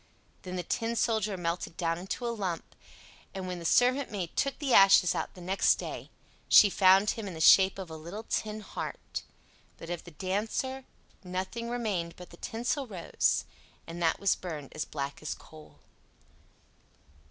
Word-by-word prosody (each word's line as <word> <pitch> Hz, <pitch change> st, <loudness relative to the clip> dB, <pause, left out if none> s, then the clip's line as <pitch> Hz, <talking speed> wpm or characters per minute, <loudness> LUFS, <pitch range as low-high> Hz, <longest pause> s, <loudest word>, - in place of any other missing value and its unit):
Then 185 Hz, 0 st, -6 dB
the 180 Hz, -, -2 dB
Tin 230 Hz, +5 st, -2 dB
Soldier 220 Hz, -4 st, 0 dB
melted 170 Hz, 0 st, -3 dB
down 165 Hz, -1 st, -1 dB
into 195 Hz, +6 st, -5 dB
a 235 Hz, -, -1 dB
lump, 190 Hz, -7 st, -4 dB, 0.6 s
and 190 Hz, -1 st, -4 dB
when 180 Hz, -1 st, -4 dB
the 170 Hz, -, -8 dB
servant 255 Hz, +8 st, +3 dB
maid 190 Hz, -6 st, -5 dB
took 275 Hz, -1 st, 0 dB
the 280 Hz, -5 st, -1 dB
ashes 195 Hz, -2 st, +7 dB
out -, -, -4 dB
next 185 Hz, +2 st, +2 dB
day, -, -, -7 dB, 0.4 s
she 205 Hz, -, +8 dB
found 190 Hz, +2 st, +5 dB
him 225 Hz, -3 st, -5 dB
in 185 Hz, -, -6 dB
the -, -, -7 dB
shape 190 Hz, +4 st, +7 dB
of 185 Hz, -4 st, -7 dB
a -, -, -6 dB
little 170 Hz, +8 st, -7 dB
tin 215 Hz, -1 st, -3 dB
heart. -, -, -6 dB, 0.6 s
But 165 Hz, -, -8 dB
of 175 Hz, -, -4 dB
the -, -, -11 dB
Dancer 215 Hz, -, -3 dB, 0.4 s
nothing 190 Hz, +6 st, -4 dB
remained 205 Hz, -9 st, -2 dB
but 180 Hz, -, -12 dB
the 170 Hz, -, -13 dB
tinsel 245 Hz, -, -2 dB
rose, 185 Hz, -6 st, 0 dB, 0.4 s
and 170 Hz, +1 st, -7 dB
that 165 Hz, -1 st, +2 dB
was 200 Hz, -1 st, +3 dB
burned 155 Hz, -6 st, -7 dB
as 155 Hz, -, -3 dB
black 140 Hz, -1 st, -5 dB
as 155 Hz, -, -4 dB
coal. 155 Hz, -1 st, -15 dB
190 Hz, 170 wpm, -30 LUFS, 170-220 Hz, 0.6 s, she